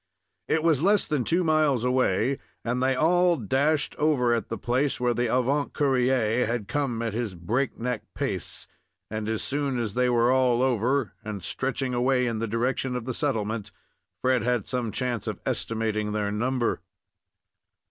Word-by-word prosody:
It 160 - +1
was 160 -5 +3
less 200 +3 +3
than 150 -5 0
two 175 +8 +2
miles 155 -6 +2
away, 125 0 +1 0.3
and 120 +2 -1
they 130 0 +2
all 175 +4 +3
dashed 140 +7 +1
over 135 -6 +2
at 115 -3 -2
the 115 - -3
place 130 +6 0
where 125 -1 +2
the 120 -1 0
avant 135 +3 +1
courier 125 -4 +2
had 115 -3 -2
come 130 -6 -1
at 115 -3 -2
his 110 -4 -3
break 115 +11 -1
neck 125 -1 -2
pace; - - -3 0.5
and 110 0 -3
as 110 -1 -1
soon 140 -2 -1
as 115 -4 -2
they 125 +1 +2
were 120 0 +3
all 130 -1 +3
over, 130 0 +1
and 105 -4 -6
stretching 130 +2 -2
away 125 +1 +2
in 115 -2 -1
the 115 - -1
direction 125 +3 -1
of 125 -2 -4
the 130 - -3
settlement, 110 -6 -2 0.5
Fred 130 -1 +3
had 120 -1 0
some 125 -4 -2
chance 120 -3 -2
of - - -3
estimating 110 -2 -1
their 105 -1 -1
number. 120 +3 0
125 Hz, 170 wpm, -26 LUFS, 115-135 Hz, 0.5 s, was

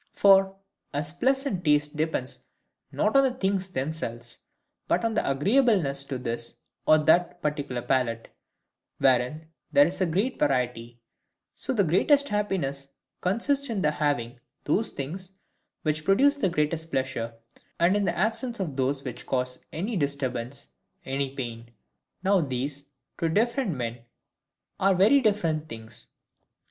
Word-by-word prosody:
For, 195 -1 +5 0.4
as 150 +2 -2
pleasant 265 -3 0
tastes 150 -1 +3
depend 155 -4 -2 0.6
not - - 0
on 275 - +7
the 260 -2 +1
things 190 -4 -1
themselves, 130 -6 -4 0.5
but - - +1
on 225 - +1
their - - 0
agreeableness 170 - +2
to 135 -1 -4
this 120 -1 -4 0.3
or 155 - +7
that 160 +3 +3
particular 145 -5 -2
palate, 120 -4 0 0.7
wherein 130 +5 +2 0.2
there 145 - +7
is 185 +4 -3
great 205 +10 0
variety; 125 -4 0 0.5
so - - -4
the 220 -6 +3
greatest 280 - +3
happiness 165 -10 -1 0.3
consists 270 +9 0
in 210 -5 -1
the 150 - +3
having 140 -5 -1 0.2
those 210 +10 +1
things 185 +7 -6 0.5
which 155 0 0
produce 275 - +4
the 195 -9 +1
greatest 160 0 -1
pleasure, 130 -3 -2 0.4
and 175 +3 +4
in 205 - +2
the 175 -3 0
absence 230 +4 -1
of 165 -8 -3
those 135 +1 0
which 130 -4 -7
cause 125 -1 -2
any 200 +8 -3
disturbance, 135 - -2 0.4
any 135 0 -2
pain. 120 -3 -6 0.5
Now 195 -1 +4
these, 140 0 -4 0.3
to 165 - +1
different 230 - +1
men, 120 -1 -4 0.8
are 195 0 +4
very 215 +10 +5
different 165 -9 0
things. 115 -1 -8
155 Hz, 135 wpm, -27 LUFS, 130-195 Hz, 0.8 s, on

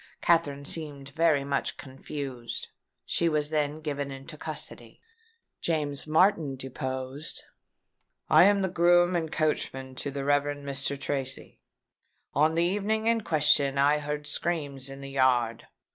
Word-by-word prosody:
Katherine 145 -5 +2
seemed 145 -3 -3
very 155 -1 +2
much 140 0 -1
confused. 135 -2 -6 0.4
She 170 - +1
was 150 -1 0
then 150 0 0
given 145 -2 -3
into 135 +4 -8
custody." - - -8 0.6
James 150 -3 -1
Martin 160 -3 +3
deposed: 130 +2 -5 0.8
"I - - +7
am 200 -1 +4
groom 175 +1 +4
and 160 -2 -1
coachman 135 -4 -1
to 145 - -3
the 140 0 -4
Rev. 145 0 +2
Mr. 140 0 -2
Tracy. 135 -1 -4 0.7
On 155 +3 +3
the 170 - +3
evening 205 +4 0
in 230 0 +3
question 145 -5 +3
I 145 +2 +4
heard 150 0 -4
screams 145 -5 -2
in 135 0 -9
the 135 0 -7
yard. 125 -4 +2
145 Hz, 130 wpm, -28 LUFS, 135-160 Hz, 0.8 s, I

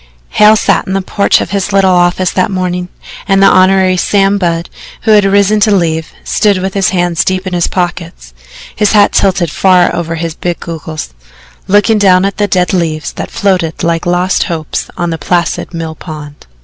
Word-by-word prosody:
Hale 210 +1 +5
sat - - 0
in 190 - -3
the 195 - 0
porch 200 +1 +1
of - - -5
his 200 0 -2
little 195 -1 +3
office 180 +1 +1
that 185 - 0
morning, 180 -2 -3 0.4
and 195 -1 +2
the 195 - +5
Hon. 185 -1 +4
Sam 200 +1 +1
Budd, 170 -2 -1 0.4
who 220 - +2
had 210 -2 +5
risen 200 +2 +2
to 215 +1 +2
leave, 160 -3 -1
stood 205 -3 +1
with 190 +1 -3
his 195 -2 +1
hands 175 -3 0
deep 185 0 -2
in 185 - -5
his 175 -1 0
pockets, 170 - -4 0.4
his 210 0 +1
hat 205 -1 +4
tilted 185 -4 +1
far 180 -1 +2
over 165 -1 -3
his 165 0 -4
big 175 +1 -4
goggles, 155 - -7 0.5
looking 205 +2 +3
down 185 -2 +4
at 195 - -3
the 205 0 0
dead 180 -2 0
leaves 160 -4 -2
that - - -6
floated 185 -4 -1
like 170 0 -1
lost 180 +1 0
hopes 160 -3 -4
on 175 -1 -2
the 165 - -4
placid 170 +1 -1
mill 165 -2 -5
pond. 150 - -10
185 Hz, 190 wpm, -11 LUFS, 170-195 Hz, 0.5 s, Hale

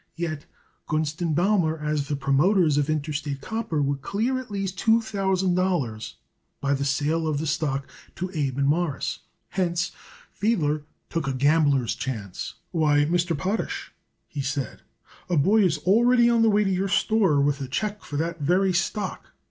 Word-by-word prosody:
Yet 155 -3 -4 0.4
Gunst 155 0 -1
& - - 0
Baumer, 175 -3 +2
as 150 -2 -2
the 145 - -1
promoters 145 +3 +3
of 145 +1 0
Interstate 150 -2 -2
Copper, 205 -4 -2
would 140 0 -1
clear 235 - -1
at 255 - -9
least 195 -2 -3
two 225 0 +4
thousand 190 -4 0
dollars 165 -13 -1 0.4
by 140 0 +1
the 140 0 -1
sale 150 +4 0
of 155 -2 0
the 155 - -2
stock 145 -3 -1 0.3
to 185 +1 -4
Abe 140 -5 -1
and 140 - +2
Morris; 155 -1 0 0.3
hence, 175 -2 -1 0.4
Fiedler 155 -9 0 0.3
took 165 -4 -2
a 135 - 0
gambler's 140 -2 +3
chance. 105 -8 -5 0.2
"Why, 150 -3 +3
Mr. 170 0 +1
Potash," 195 +9 -3 0.3
he 145 - -4
said, 135 0 -3 0.5
"a 175 - +2
boy 200 +10 +4
is 175 -6 +3
already 235 +8 +4
on 230 -1 +3
the 225 - +5
way 210 0 +3
to 195 - 0
your 190 +1 0
store 195 -7 +3
with 140 0 +1
a 135 - -3
check 210 +10 -3
for 145 - -5
that 165 +2 -2
very 185 +5 +2
stock. 190 +2 -2
160 Hz, 170 wpm, -25 LUFS, 145-190 Hz, 0.5 s, the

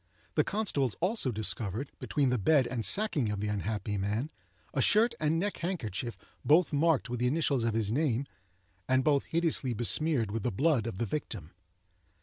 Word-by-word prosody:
The 150 - +3
constables, 150 - -1
also, 180 - 0
discovered, 105 +4 -2
between 140 -3 0
the 125 -1 +1
bed 140 +5 +4
and 120 -1 -3
sacking 145 - +2
of 105 -1 -2
the 105 +1 -2
unhappy 105 0 -2
man, 105 +10 -2 0.4
a 135 - +1
shirt 225 - +4
and 155 +1 +1
neck 200 +4 -1
handkerchief 120 - -4 0.3
both 155 +2 +4
marked 155 -1 +2
with 125 -1 -4
the 125 - +2
initials 140 -3 +1
of 115 -1 0
his 110 -2 0
name, 135 -1 0 0.6
and 130 0 +3
both 140 -1 +2
hideously 160 -7 0
besmeared 120 0 +1
with 115 +1 -2
the 120 - -1
blood 130 - +1
of 115 - -5
the 115 - -1
victim. 100 - -4
130 Hz, 175 wpm, -30 LUFS, 110-155 Hz, 0.6 s, bed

